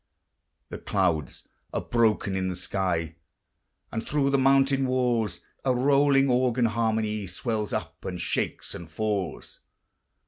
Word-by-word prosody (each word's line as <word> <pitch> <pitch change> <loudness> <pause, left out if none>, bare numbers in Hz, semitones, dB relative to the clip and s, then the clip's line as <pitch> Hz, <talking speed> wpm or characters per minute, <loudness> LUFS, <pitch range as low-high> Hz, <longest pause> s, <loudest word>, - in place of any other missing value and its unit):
The - - -6
clouds 85 -7 -1 0.3
are - - 0
broken 110 -4 +1
in 95 -1 -1
the 90 - -2
sky, 85 -3 -2 0.7
And 110 0 -3
thro' 140 -1 +1
the 140 - +3
mountain 135 0 +4
walls 120 -6 0 0.2
A 130 -2 +2
rolling 140 +1 +4
organ 125 -1 +2
harmony 110 -2 0
Swells 105 +3 -2
up, 80 -1 -4
and 90 -1 -4
shakes - - -2
and 85 -1 -8
falls. 100 0 -3
110 Hz, 130 wpm, -26 LUFS, 95-130 Hz, 0.7 s, mountain